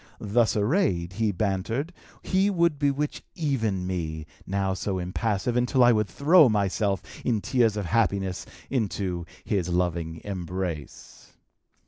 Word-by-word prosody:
Thus 110 +2 +2
arrayed, 105 - +1
he 110 +1 +1
bantered, 110 - -2 0.3
he 190 +2 +2
would 170 -6 +1
bewitch 145 +1 0
even 115 - -1
me, 80 -4 -3 0.2
now 95 0 0
so 95 0 -2
impassive, 100 +6 -1
until 125 +1 +3
I 120 - +7
should 105 -2 +2
throw 145 - +5
myself, 100 -2 0 0.2
in 115 -4 +1
tears 115 -1 +1
of 105 - -2
happiness, 100 -2 0 0.2
into 95 -8 -2 0.2
his 95 -4 0
loving 85 -2 -1
embrace. 90 -5 -6
100 Hz, 125 wpm, -26 LUFS, 90-125 Hz, 0.3 s, I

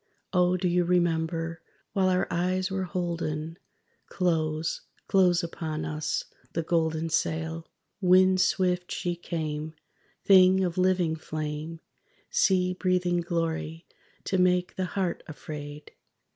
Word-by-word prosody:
O 180 0 +3
do 180 0 0
you 175 0 +2
remember? 165 -1 0 0.3
while 190 -1 +2
our 185 0 +2
eyes 185 +2 0
were 190 -1 -1
holden, 170 -2 -3 0.5
Close, 160 -3 -1 0.3
close 180 -2 +4
upon 160 -2 -4
us, 155 0 -2 0.3
the 165 - -1
Golden 160 -1 0
Sail? 160 0 -1 0.3
Wind 185 0 +5
swift 180 -2 +1
she 175 -2 -2
came, 155 -2 -4 0.5
thing 190 -1 +6
of 180 0 -1
living 180 -3 +2
flame, 155 +1 -5 0.5
Sea 185 -1 +3
breathing 180 -1 +1
Glory, 165 -1 -3 0.4
to 190 - 0
make 180 0 +2
the 185 - -1
heart 180 -2 -2
afraid! 150 -1 -8
175 Hz, 115 wpm, -27 LUFS, 160-185 Hz, 0.5 s, thing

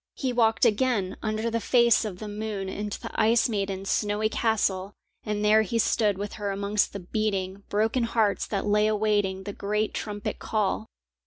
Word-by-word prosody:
He 260 -3 -2
walked 225 0 +3
again 215 -4 +1
under 215 +1 -1
the 230 - 0
face 235 -1 +4
of 195 -4 -5
the 215 - -7
moon 205 -2 -4
into 205 +1 -4
the - - -7
ice 225 +1 +3
maiden's 195 -3 -2
snowy 210 +1 +1
castle, 205 -4 0 0.3
and 210 -1 -2
there 215 +1 +6
he 220 +2 -1
stood 210 -2 +2
with 205 +1 -5
her 205 - -1
amongst 200 +1 0
the 200 - -5
beating, 195 0 -2
broken 225 +4 +1
hearts 225 -3 +1
that 200 -2 -2
lay 210 +1 +3
awaiting 205 -3 +1
the 205 +1 -6
great 210 +2 -1
trumpet 205 -1 -4
call. 215 0 -1
210 Hz, 175 wpm, -26 LUFS, 200-220 Hz, 0.3 s, there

